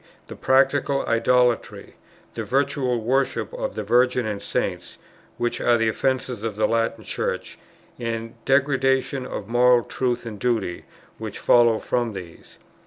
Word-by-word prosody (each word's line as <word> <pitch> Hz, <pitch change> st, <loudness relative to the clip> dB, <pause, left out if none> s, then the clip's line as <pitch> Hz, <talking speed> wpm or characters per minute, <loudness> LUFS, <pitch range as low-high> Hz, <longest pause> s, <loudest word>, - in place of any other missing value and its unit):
"the -, -, -9 dB
practical 135 Hz, +1 st, +2 dB
idolatry, 120 Hz, +1 st, +1 dB, 0.4 s
the -, -, -4 dB
virtual 130 Hz, -2 st, 0 dB
worship 120 Hz, -3 st, 0 dB
of -, -, -4 dB
the 110 Hz, -, -3 dB
Virgin 125 Hz, +3 st, +2 dB
and 105 Hz, -2 st, -3 dB
Saints, -, -, -3 dB, 0.4 s
which 120 Hz, 0 st, -2 dB
are 120 Hz, -1 st, +4 dB
the 115 Hz, -1 st, +1 dB
offence 130 Hz, +3 st, 0 dB
of 115 Hz, -4 st, -5 dB
the 110 Hz, -, +2 dB
Latin 115 Hz, 0 st, -1 dB
Church, -, -, -4 dB, 0.4 s
and 115 Hz, -1 st, -3 dB
the -, -, -21 dB
degradation 135 Hz, -1 st, +1 dB
of 100 Hz, -, -6 dB
moral 120 Hz, +1 st, +4 dB
truth 125 Hz, 0 st, -2 dB
and 110 Hz, -3 st, -7 dB
duty, 110 Hz, -7 st, -1 dB, 0.3 s
which -, -, -6 dB
follows 120 Hz, -2 st, +4 dB
from 120 Hz, -3 st, 0 dB
these." 90 Hz, -4 st, -11 dB
120 Hz, 145 wpm, -23 LUFS, 115-130 Hz, 0.4 s, are